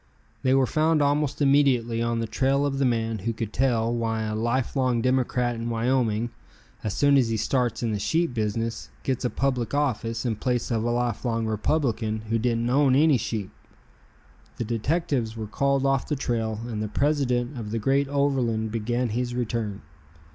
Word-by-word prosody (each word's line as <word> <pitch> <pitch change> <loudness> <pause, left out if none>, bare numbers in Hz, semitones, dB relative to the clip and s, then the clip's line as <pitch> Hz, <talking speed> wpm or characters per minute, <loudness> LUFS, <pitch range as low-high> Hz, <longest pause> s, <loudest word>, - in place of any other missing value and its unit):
They 130 0 +3
were 135 -1 +4
found 155 +4 +2
almost 145 0 +1
immediately 130 -5 +3
on 115 0 0
the 115 - -1
trail 135 +5 +1
of 135 -1 -1
the 140 - +2
man 115 -2 0
who 115 +5 -2
could 110 -1 -5
tell 120 -3 +1
why 115 -1 -1
a 110 0 -2
life 120 +5 -1
long 130 -3 +2
Democrat 125 0 +1
in 115 0 -4
Wyoming, 115 -1 0 0.5
as 105 -1 -2
soon 145 +2 +4
as 120 -3 +1
he 115 - 0
starts 120 0 0
in 115 - 0
the 105 - -1
sheep 165 +6 0
business, 115 0 -2
gets 130 -1 -1
a - - +2
public 130 -1 -1
office 115 -5 -1
in 115 -3 -1
place 125 +1 -1
of 110 -2 0
a 120 - 0
life 120 -2 -1
long 115 -2 0
Republican 110 -1 0
who 115 - +2
didn't 115 0 0
own 135 +1 +4
any 150 -1 +5
sheep. 105 -5 -3 1.1
The - - -2
detectives 120 0 -1
were 110 - -4
called 140 +5 0
off 135 -1 +1
the 150 - 0
trail 115 -5 -2
and 110 -3 -4
the 110 - -2
president 130 0 0
of 105 -2 -5
the 115 - -2
great 135 +5 +1
Overland 130 -6 0
began 120 +2 -1
his 120 +2 -2
return. 110 -4 -3
120 Hz, 185 wpm, -25 LUFS, 115-135 Hz, 1.1 s, any